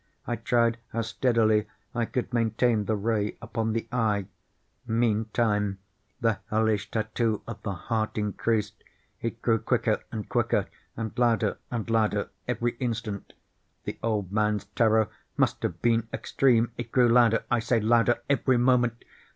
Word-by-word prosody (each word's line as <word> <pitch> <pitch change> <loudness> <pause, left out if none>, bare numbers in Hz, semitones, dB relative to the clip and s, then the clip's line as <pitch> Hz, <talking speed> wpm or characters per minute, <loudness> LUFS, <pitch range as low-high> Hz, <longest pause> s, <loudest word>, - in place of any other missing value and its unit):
I 120 - -1
tried 115 0 +1
how 115 +1 0
steadily 110 -3 +2 0.3
I 120 -1 0
could 125 +2 -3
maintain 115 -1 +2
the 110 - +1
ray 105 0 -1
upon 110 -1 -2
the 115 - -2
eve. 105 -5 +1 0.6
Meantime 110 -3 +1 0.4
the 115 -3 +1
hellish 110 -2 +1
tattoo 110 0 -1
of 110 -3 -7
the 100 - -3
heart 110 +5 -2
increased. 105 0 -1 0.4
It 115 0 -4
grew 115 -2 +3
quicker - - +1
and 105 -2 -5
quicker, - - +1 0.3
and 110 -1 -3
louder 120 -2 +2
and 115 -3 -3
louder 115 -2 +1 0.2
every 120 0 -1
instant. 115 -5 -3 0.5
The - - -6
old 105 -5 -1
man's 105 -1 +1
terror 110 -1 +4 0.3
must - - +1
have - - -3
been 115 -1 +2
extreme! 120 -3 +2
It 120 - -6
grew 125 -2 +5
louder, 115 -1 +4
I 120 - +3
say, 115 +1 +1
louder 115 +2 +3
every 135 -2 +2
moment! 120 -1 +2
115 Hz, 145 wpm, -27 LUFS, 110-120 Hz, 0.6 s, grew